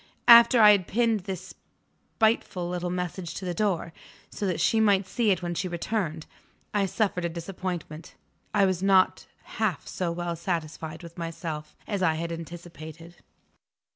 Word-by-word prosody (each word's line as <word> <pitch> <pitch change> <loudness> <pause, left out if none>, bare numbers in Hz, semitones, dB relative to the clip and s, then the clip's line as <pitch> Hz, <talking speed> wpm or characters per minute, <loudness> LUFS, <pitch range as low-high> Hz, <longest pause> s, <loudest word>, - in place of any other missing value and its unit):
After 235 +1 +9
I 210 -1 +9
had 195 -4 +2
pinned 225 -3 +1
this 190 -2 -6 0.6
spiteful 215 -5 +1
little 180 0 -3
message 180 -1 -4
to 190 - -6
the 180 - -2
door, 175 -4 -1 0.4
so 205 - -3
that 180 -3 -1
she 220 +7 +3
might 200 -3 +3
see 225 +3 0
it 185 -2 +1
when 175 0 -2
she 175 +2 -2
returned, 170 -2 -3 0.5
I 200 -2 +2
suffered 190 -3 -1
a 170 - 0
disappointment. 170 -2 -6 0.4
I 200 - +4
was 185 -2 0
not 190 -1 +3 0.3
half - - 0
so 180 -2 -2
well 170 0 -3
satisfied 160 -1 -4
with 170 +1 -11
myself 165 -2 -5
as 200 -3 -3
I 165 -3 +3
had 170 +1 -4
anticipated. 165 0 -9
180 Hz, 160 wpm, -27 LUFS, 170-195 Hz, 0.6 s, After